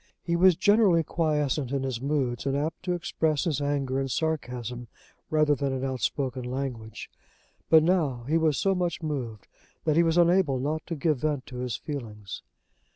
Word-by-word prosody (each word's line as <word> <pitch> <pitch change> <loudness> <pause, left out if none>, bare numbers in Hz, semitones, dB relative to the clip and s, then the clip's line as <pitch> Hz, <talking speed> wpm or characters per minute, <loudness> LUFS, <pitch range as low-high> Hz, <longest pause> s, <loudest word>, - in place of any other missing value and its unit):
He 170 - 0
was 180 0 +6
generally 205 -4 +4
quiescent 150 -4 0
in 140 -1 -1
his 130 -3 -3
moods, 135 -3 -1
and 135 0 +1
apt 155 +3 -2
to 180 - 0
express 160 -3 0
his 150 -4 -1
anger 140 -2 0
in 135 - -2
sarcasm 125 -5 -3 0.4
rather 155 -1 +3
than 140 -1 -1
in 130 0 -2
outspoken 130 0 -2
language; 125 -4 -5 0.6
but 160 -1 +7
now 155 -9 +1
he 155 +6 +1
was 155 -3 +2
so 195 - +2
much 175 -2 -2
moved 125 -9 -4 0.4
that 155 -2 +2
he 170 - +6
was 165 0 +2
unable 175 -5 +4
not 150 +5 -2
to 170 - -3
give 150 -2 0
vent 150 -3 -1
to 125 - -9
his 125 -2 -3
feelings. 110 -9 -7
145 Hz, 175 wpm, -27 LUFS, 130-160 Hz, 0.6 s, but